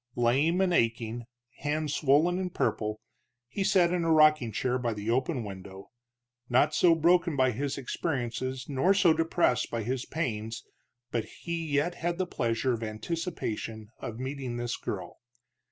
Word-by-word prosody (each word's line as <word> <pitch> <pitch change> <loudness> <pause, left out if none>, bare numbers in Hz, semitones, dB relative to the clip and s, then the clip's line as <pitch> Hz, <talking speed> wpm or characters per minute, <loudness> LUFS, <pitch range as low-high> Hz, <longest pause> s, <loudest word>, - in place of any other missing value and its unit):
Lame 140 +10 +2
and 185 -2 +2
aching, 115 -3 0 0.3
hands 150 0 -1
swollen 155 +6 +3
and 185 -1 -3
purple, 105 0 -1 0.5
he 195 +11 -2
sat 180 -2 +3
in 175 -1 0
a 165 - +2
rocking 155 -6 +5
chair 125 +3 0
by 120 -3 -1
the 105 +2 -2
open 130 +1 0
window, 95 -1 -9 0.6
not 135 +5 +3
so 170 0 +5
broken 170 0 +3
by 130 -2 +3
his 140 +5 -3
experiences 130 -2 -3
nor 145 +8 +2
so 180 -5 +5
depressed 165 -5 +1
by 115 -1 -2
his 125 +2 -2
pains 115 -8 -3 0.5
but 115 -2 -1 0.2
he 170 -1 -3
yet 150 +4 +1
had 175 0 -2
the 185 - 0
pleasure 120 -5 0
of 115 - -4
anticipation 110 - -4
in 115 - -5
meeting 130 -1 -4
this 120 0 -2
girl. - - -6
135 Hz, 155 wpm, -29 LUFS, 115-165 Hz, 0.6 s, rocking